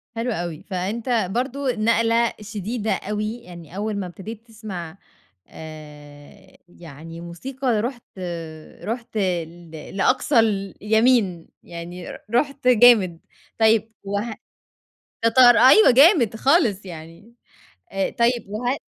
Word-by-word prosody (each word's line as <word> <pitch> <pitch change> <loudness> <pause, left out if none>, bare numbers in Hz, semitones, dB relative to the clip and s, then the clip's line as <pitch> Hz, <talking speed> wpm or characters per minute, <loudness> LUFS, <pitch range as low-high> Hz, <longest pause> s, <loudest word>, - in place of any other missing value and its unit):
حلو 235 +2 -2
أوي، 170 -5 -4
فأنت 215 +3 -2
برضه 260 +3 -1
نقلة 230 +1 +2
شديدة 210 +2 -4
أوي، 210 +2 -3
يعني 170 -2 -12
أول 210 +1 -2
ما 195 - -3
ابتديت 215 +6 -10
تسمَع 195 -6 -8 0.5
آآ 150 +2 -13
يعني 165 0 -11
موسيقى 245 +7 -3
رُحت، 240 -5 -7 0.6
رُحت 230 0 -5
ل 175 -3 -3 0.3
لأقصى 255 +4 +2
اليمين، 210 -2 +1 0.2
يعني 175 +1 -8
ر - - -8 0.2
رُحت 275 +1 0
جامد، 220 -8 +5 0.4
طيب 220 0 +3
وه 205 +3 -3 0.9
تتار 245 +2 +6
أيوه، 270 +7 +7
جامد 265 - +5
خالص، 230 - +2
يعني 170 +6 -11 0.6
آآ، 195 0 -1
طيب 240 -1 +1
وهل 245 +6 -2
215 Hz, 110 wpm, -22 LUFS, 175-240 Hz, 0.9 s, أيوه